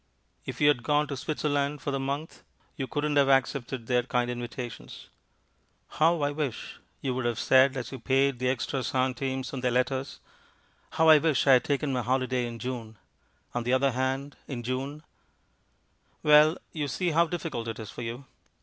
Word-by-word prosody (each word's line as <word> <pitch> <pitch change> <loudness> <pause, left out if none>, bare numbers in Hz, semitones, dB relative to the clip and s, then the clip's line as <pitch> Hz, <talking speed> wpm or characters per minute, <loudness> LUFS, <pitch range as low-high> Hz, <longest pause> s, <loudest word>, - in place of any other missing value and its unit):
If - - -5
you 145 - +4
had 145 -4 +4
gone 150 +3 +2
to 140 - -3
Switzerland 145 0 -1
for 145 +1 -3
the 135 - -1
month, 140 +4 -4 0.3
you 135 -4 -4
couldn't 145 +3 -1
have 140 -1 +4
accepted 135 -2 +1
their 125 +1 +2
kind 125 -1 -1
invitations. 120 -1 -7 0.8
"How 160 0 +2
I 145 - +1
wish," 145 -5 -4 0.2
you 130 - -1
would 125 -1 -2
have 120 -2 0
said 130 0 +4
as 125 -2 -5
you 135 - -7
paid 135 +1 +1
the 125 0 +1
extra 130 +1 -1
centimes 130 +1 -1
on 130 - -4
their 125 - +1
letters, 130 +2 -1 0.7
"how 160 0 +4
I 155 -1 +9
wish 155 -2 +1
I 135 - +7
had 125 - +4
taken 140 -1 0
my 125 - 0
holiday 130 0 0
in 115 0 -7
June." 115 -3 -6 0.6
On 120 - -1
the 120 +2 0
other 135 +1 +3
hand, 130 +3 -2
in 125 -4 -5
June 135 +5 -4 1.2
Well, 150 +2 +6
you 150 -3 -3
see 175 +6 -1
how 170 +2 +3
difficult 160 -9 -4
it 115 0 -4
is 110 -3 -8
for - - -8
you. 120 +3 -6
135 Hz, 185 wpm, -28 LUFS, 125-145 Hz, 1.2 s, I